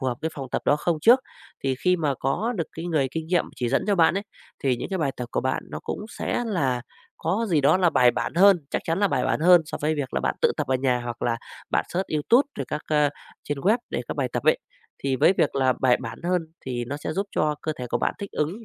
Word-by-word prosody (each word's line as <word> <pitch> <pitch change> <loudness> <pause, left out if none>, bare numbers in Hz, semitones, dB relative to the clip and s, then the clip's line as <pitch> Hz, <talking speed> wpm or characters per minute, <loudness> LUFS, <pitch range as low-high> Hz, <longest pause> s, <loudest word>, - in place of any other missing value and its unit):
phù 130 - -2
hợp 125 - -1
với 160 - -2
phòng 135 -3 -6
tập - - -1
đó 145 - +4
không 160 +1 0
trước. 240 +9 +6 0.4
Thì 135 -1 +1
khi 180 +7 +2
mà 150 -4 0
có 210 - 0
được 165 - -1
cái 165 - -7
người 150 -6 +1
kinh 160 +1 -4
nghiệm 175 +1 +2
chỉ 120 -2 -1
dẫn 135 - +1
cho 205 - +3
bạn 165 -1 +4
ấy, 200 - -1 0.4
thì 130 -3 +2
những - - -5
cái 190 -1 -2
bài 140 -4 0
tập 125 - -4
của - - +1
bạn 130 +1 -1
nó - - -5
cũng - - -5
sẽ 240 - -1
là 135 - 0 0.3
có 200 +8 -1
gì 160 -5 +3
đó 145 +5 +5
là 180 -2 +3
bài 125 -4 +5
bản - - -3
hơn, 195 +1 +7
chắc - - -1
chắn 165 +3 0
là 205 - +4
bài - - 0
bản - - 0
hơn 175 +1 +7
so 155 - -6
với 155 +1 +1
việc 140 -4 -4
là - - +1
bạn - - 0
tự - - +3
tập - - -1
ở 130 - +1
nhà 125 -1 +1
hoặc 120 -1 -6
là 115 -1 +1 0.3
bạn - - +1
search 185 +2 -2
Youtube 235 - +3
rồi - - -1
các 150 - -3
ờ, 150 -2 +3 0.3
trên 145 -1 -3
web 210 - +3
để - - -2
các - - -4
bài - - 0
tập - - -2
ấy. - - +4 0.4
Thì 135 -1 -1
với 180 - +5
việc 145 - +2
là 130 -2 +3
bài 125 -2 +4
bản 115 -2 -6
hơn 180 0 +1 0.2
thì 120 -2 -3
nó 140 +4 -4
sẽ 155 - -4
giúp 195 +3 -2
cho 150 0 +2
cơ 155 - -1
thể 125 - -4
của - - +1
bạn - - 0
thích 200 - -6
ứng 180 +10 -2
150 Hz, 285 wpm, -25 LUFS, 130-180 Hz, 0.4 s, hơn